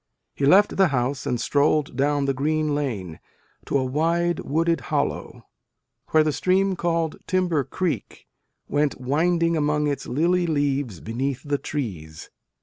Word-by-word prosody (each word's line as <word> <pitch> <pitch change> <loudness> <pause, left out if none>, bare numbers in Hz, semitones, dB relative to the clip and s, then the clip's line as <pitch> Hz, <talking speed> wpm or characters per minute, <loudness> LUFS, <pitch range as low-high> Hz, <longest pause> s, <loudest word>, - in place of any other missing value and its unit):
He 140 - 0
left 200 +7 +5
the 190 -1 +5
house 135 -1 -1
and 125 - -1
strolled 145 +2 +1
down 145 +1 +1
the 135 - +1
green 155 +2 0
lane, 110 - -3 0.5
to - - +1
a 130 - 0
wide 165 +5 0
wooded 165 +3 0
hollow, - - -2 0.6
where 155 -1 +4
the 155 - +1
stream 190 +3 +1
called 165 -2 -1
Timber 180 -6 +1
Greek 180 +4 -3 0.4
went 145 -2 0
winding 165 +6 +1
among 150 -1 +1
its 145 -1 -2
lily 175 +5 +1
leaves 140 - -1
beneath 130 +4 -3
the 145 -1 -1
trees. 85 - -6
150 Hz, 145 wpm, -24 LUFS, 135-165 Hz, 0.6 s, left